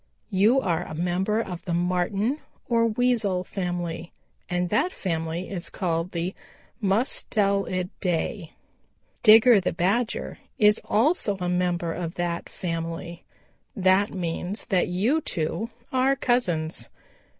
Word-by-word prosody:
You 210 +7 +4
are 175 -7 0
a 155 - -7
member 180 +6 0
of 180 -6 -4
the 170 - -1
Marten 185 - 0 0.3
or 230 -1 +3
Weasel 220 -5 +1
family, 175 -3 -4 0.4
and 180 0 0
that 290 - +2
family 165 - -3
is 175 -4 -4
called 170 -2 -1
the 175 +2 -2 0.5
'Mus 210 +5 +1
tel 200 -1 +1
i 185 -1 -1
dae.' 175 -1 -2 0.7
Digger 225 0 +8
the 185 - -1
Badger 205 +8 -1 0.2
is 210 0 +4
also 225 - +2
a 180 - -2
member 175 -2 0
of 170 0 -4
that 175 -1 -2
family. 170 0 -5 0.5
That 190 0 +3
means 180 +2 -3
that 190 -4 +2
you 215 - +1
two 175 +8 -2 0.2
are 260 +1 +3
cousins. 170 - 0
185 Hz, 130 wpm, -25 LUFS, 175-215 Hz, 0.7 s, Digger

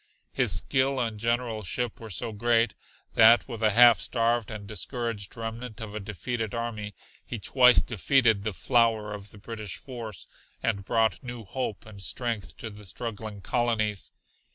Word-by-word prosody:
His - - +2
skill 135 0 +2
and 115 -3 -2
generalship 115 -1 -1
were 110 - -9
so 105 +4 -3
great 115 +1 +2 0.4
that 115 +1 +7
with 115 -4 -6
a 110 - +4
half 120 +2 +7
starved 115 -1 +1
and 105 -2 -7
discouraged 110 +1 -3
remnant 115 0 -6
of 110 -2 -6
a 110 - -4
defeated 110 +3 -4
army 110 -3 -4 0.3
he 120 - -5
twice 125 +3 +6
defeated 115 -1 +3
the 110 - -1
flower 110 0 +2
of 100 0 -8
the 105 - -15
British 110 -1 -6
force, 115 - -8 0.4
and 100 -3 0
brought 110 -4 +1
new 120 -3 -7
hope 110 0 -4
and 105 -3 -11
strength 110 +4 -2
to 110 - -7
the 105 -1 -11
struggling 110 0 -6
colonies. 110 -3 0
115 Hz, 155 wpm, -27 LUFS, 105-120 Hz, 0.4 s, that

